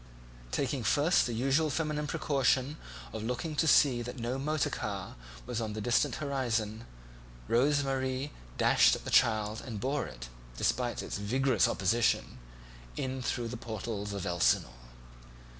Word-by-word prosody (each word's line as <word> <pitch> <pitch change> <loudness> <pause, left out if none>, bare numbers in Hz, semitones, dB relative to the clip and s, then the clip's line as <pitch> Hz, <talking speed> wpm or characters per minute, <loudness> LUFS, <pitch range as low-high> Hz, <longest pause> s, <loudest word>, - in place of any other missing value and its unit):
Taking 135 - -1
first 145 - +3
the 120 - -3
usual 135 +7 +2
feminine 150 0 -1
precaution 140 0 +1 0.4
of 110 - -4
looking 125 +7 -3
to 160 - +2
see 135 -5 +5
that 125 +2 -6
no 120 +2 -2
motor 155 +2 0
car 100 -3 -4 0.3
was 120 -1 -3
on 110 -1 -3
the 110 - -4
distant 120 +4 +1
horizon, 115 -6 -2 0.6
Rose 140 +4 +3
Marie 135 +1 -2 0.3
dashed - - +5
at - - -9
the - - -4
child 110 0 +3
and 115 -5 -6
bore 135 +6 -1
it, - - -9 0.3
despite - - 0
its - - -4
vigorous 125 +2 +2
opposition, 110 - +1 0.6
in 130 0 -3
through 120 -1 -2
the 125 - -5
portals 110 -2 -5
of 100 -2 -4
Elsinore. 85 -7 +2
125 Hz, 145 wpm, -31 LUFS, 110-140 Hz, 0.6 s, see